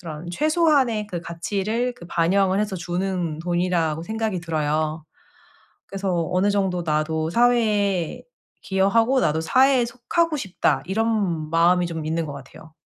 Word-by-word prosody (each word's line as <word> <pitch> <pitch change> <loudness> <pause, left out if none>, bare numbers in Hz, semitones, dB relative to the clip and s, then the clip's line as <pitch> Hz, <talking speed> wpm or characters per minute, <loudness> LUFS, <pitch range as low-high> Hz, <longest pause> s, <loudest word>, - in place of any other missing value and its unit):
그런 165 -1 -8
최소한의 285 - +2
그 175 -4 -4
가치를 205 +8 -2
그 170 - -12
반영을 190 +3 +2
해서 205 -2 -2
주는 175 -2 -3
돈이라고 175 -2 0
생각이 220 -1 -2
들어요. 155 -1 -2 0.8
그래서 190 -4 -2
‘어느 185 +3 +2
정도 190 -3 0
나도 155 +1 0
사회에 210 -6 +1 0.4
기여하고 225 +7 +2
나도 160 -7 +1
사회에 260 - +4
속하고 300 +7 -1
싶다.‘ 195 -8 0
이런 195 -7 -1
마음이 175 +2 +3
좀 160 -2 -5
있는 165 +1 -1
것 145 - -6
같아요. 140 +3 -13
185 Hz, 310 characters per minute, -23 LUFS, 165-220 Hz, 0.8 s, 사회에